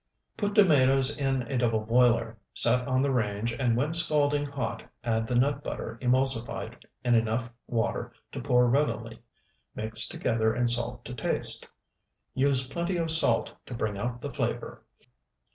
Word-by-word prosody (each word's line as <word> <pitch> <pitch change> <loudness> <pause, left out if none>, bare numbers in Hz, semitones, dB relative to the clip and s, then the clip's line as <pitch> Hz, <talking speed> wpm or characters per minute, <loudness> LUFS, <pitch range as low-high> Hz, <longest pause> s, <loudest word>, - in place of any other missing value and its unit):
Put 205 -1 -2
tomatoes 135 -7 +4
in 135 -2 -1 0.2
double 115 -3 +1
boiler, 115 0 +2 0.2
set 125 +2 +1
on 130 0 +1
the 140 - +1
range, 110 -1 -1
and 120 -3 0
when 145 +6 -1
scalding 145 -3 +2
hot 125 -5 -4 0.2
add 110 -2 -1
the 125 - -2
nut 140 +3 +1
butter 115 -5 -6
emulsified 130 -1 +2 0.2
in 120 -1 +2
enough 115 +1 0 0.2
water 115 -1 -2 0.2
to - - -6
pour 125 0 +3
readily, 115 -4 -1 0.5
mix 110 0 0
together 110 -1 -1
and 120 0 +1
salt 120 0 0
to - - -7
taste. 125 - +2 0.7
Use 130 -1 +2
plenty 170 +6 -3
of 165 -1 0
salt 160 -2 +3
to 125 - -6
bring 105 -4 -3
out 120 +3 -4
the - - -6
flavor. - - -4
125 Hz, 150 wpm, -27 LUFS, 115-140 Hz, 0.7 s, tomatoes